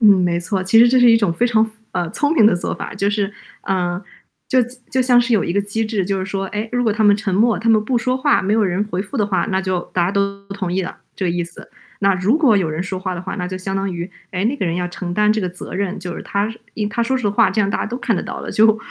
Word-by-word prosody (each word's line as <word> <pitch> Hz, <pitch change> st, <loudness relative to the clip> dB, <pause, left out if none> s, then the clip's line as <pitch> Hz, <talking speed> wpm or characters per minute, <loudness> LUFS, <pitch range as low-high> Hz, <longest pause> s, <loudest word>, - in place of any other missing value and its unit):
嗯， 215 Hz, -, +7 dB
没 175 Hz, -1 st, +1 dB
错。 190 Hz, +2 st, -2 dB
其 190 Hz, +4 st, +4 dB
实 235 Hz, +1 st, +8 dB
这 255 Hz, +1 st, +4 dB
是 245 Hz, -1 st, +7 dB
一 225 Hz, -, +6 dB
种 210 Hz, -6 st, +1 dB
非 235 Hz, +9 st, +1 dB
常 225 Hz, -2 st, +3 dB
符 220 Hz, -, -9 dB, 0.2 s
呃， 170 Hz, -2 st, -2 dB
聪 290 Hz, -, 0 dB
明 220 Hz, -, +5 dB
的 210 Hz, -, +6 dB
做 175 Hz, -, -3 dB
法， -, -, -6 dB
就 200 Hz, 0 st, 0 dB
是， 205 Hz, -1 st, -1 dB, 0.3 s
嗯， 180 Hz, -1 st, -1 dB, 0.5 s
就 260 Hz, -, +3 dB, 0.3 s
就 260 Hz, -, +1 dB
像 250 Hz, -1 st, +5 dB
是 245 Hz, 0 st, -1 dB
有 215 Hz, -, +3 dB
一 -, -, -2 dB
个 200 Hz, +2 st, +1 dB
机 205 Hz, +3 st, -2 dB
制， 215 Hz, -3 st, -1 dB
就 195 Hz, +1 st, -1 dB
是 185 Hz, -, -3 dB
说， 195 Hz, -1 st, -3 dB
诶， 210 Hz, +3 st, -4 dB
如 245 Hz, 0 st, +1 dB
果 225 Hz, -3 st, +2 dB
他 215 Hz, +1 st, +1 dB
们 205 Hz, -1 st, +6 dB
沉 210 Hz, -2 st, -3 dB
默， 220 Hz, +4 st, +3 dB
他 230 Hz, -, -2 dB
们 220 Hz, -1 st, +5 dB
不 250 Hz, +3 st, 0 dB
说 255 Hz, +2 st, +1 dB
话， 285 Hz, +2 st, +2 dB
没 200 Hz, -, 0 dB
有 220 Hz, -1 st, +3 dB
人 185 Hz, +1 st, 0 dB
回 180 Hz, -, -1 dB
复 205 Hz, +8 st, -6 dB
的 210 Hz, -, +2 dB
话， 190 Hz, -4 st, 0 dB
那 190 Hz, -3 st, -1 dB
就 185 Hz, -2 st, -1 dB
大 175 Hz, -, +2 dB
家 175 Hz, -, 0 dB
都 200 Hz, 0 st, -1 dB
同 195 Hz, -3 st, -4 dB
意 190 Hz, +1 st, 0 dB
了， 180 Hz, -, -6 dB, 0.2 s
这 190 Hz, -, -4 dB
个 175 Hz, -, +1 dB
意 175 Hz, 0 st, -1 dB
思。 170 Hz, 0 st, -13 dB, 0.3 s
那 195 Hz, -1 st, +4 dB
如 190 Hz, +9 st, +2 dB
果 275 Hz, -9 st, +4 dB
有 185 Hz, -5 st, +1 dB
人 155 Hz, +2 st, -3 dB
说 185 Hz, 0 st, -4 dB
话 185 Hz, 0 st, -3 dB
的 175 Hz, -, -6 dB
话， 185 Hz, -, -5 dB
那 180 Hz, -, -3 dB
就 185 Hz, +1 st, -5 dB
相 195 Hz, +1 st, -3 dB
当 195 Hz, 0 st, -1 dB
于， 170 Hz, +2 st, -5 dB, 0.2 s
诶， 185 Hz, +1 st, -1 dB
那 250 Hz, +6 st, +1 dB
个 195 Hz, -, -2 dB
人 165 Hz, -, -1 dB
要 180 Hz, 0 st, -1 dB
承 175 Hz, 0 st, -5 dB
担 210 Hz, +1 st, +3 dB
这 215 Hz, -, -1 dB
个 185 Hz, -, -1 dB
责 180 Hz, +1 st, -9 dB
任， 195 Hz, +1 st, -2 dB
就 180 Hz, -1 st, -5 dB
是 -, -, -7 dB
他 205 Hz, +2 st, -1 dB, 0.2 s
一 215 Hz, -, -2 dB
他 215 Hz, -, -3 dB
说 260 Hz, +3 st, +1 dB
实 240 Hz, -5 st, 0 dB
话， 200 Hz, -, +3 dB
这 215 Hz, -, 0 dB
样 200 Hz, -1 st, +1 dB
大 -, -, -1 dB
家 -, -, -2 dB
都 235 Hz, +3 st, -4 dB
看 235 Hz, -4 st, 0 dB
得 -, -, -1 dB
到 -, -, -6 dB
的， -, -, -5 dB
就， 220 Hz, 0 st, +4 dB
200 Hz, 340 characters per minute, -19 LUFS, 185-225 Hz, 0.5 s, 实